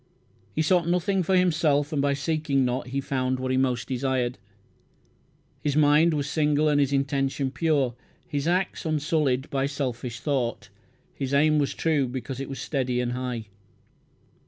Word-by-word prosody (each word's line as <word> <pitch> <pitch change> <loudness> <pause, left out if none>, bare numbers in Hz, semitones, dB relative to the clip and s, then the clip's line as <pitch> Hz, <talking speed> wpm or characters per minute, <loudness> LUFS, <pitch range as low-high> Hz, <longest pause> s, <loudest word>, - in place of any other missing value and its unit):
He 155 - +2
sought 170 +1 +2
nothing 180 +2 +1
for 185 +2 +1
himself 155 -4 +2
and 145 - +1
by 140 0 +2
seeking 145 -2 0
not 125 0 -2
he 135 +2 -2
found 130 -1 -1
what 130 0 -2
he - - +2
most 125 -2 0
desired. 130 -1 -1 1.2
His 145 -2 -1
mind 155 +2 +4
was 145 -2 -1
single 150 0 +2
and 145 -1 +3
his 140 -1 +2
intention 135 -1 0
pure; 140 -3 +1 0.3
his 145 0 -2
acts 180 +2 0
unsullied 150 -4 0
by 135 0 0
selfish 125 -4 -4
thought; 120 -7 -2 0.4
his 135 0 -2
aim 155 +1 +4
was 140 - -1
true 150 -5 +1
because 130 +1 -5
it 135 - -5
was 135 - -6
steady 130 -4 -1
and 125 -1 -1
high. 125 -2 -3
140 Hz, 160 wpm, -26 LUFS, 130-155 Hz, 1.2 s, mind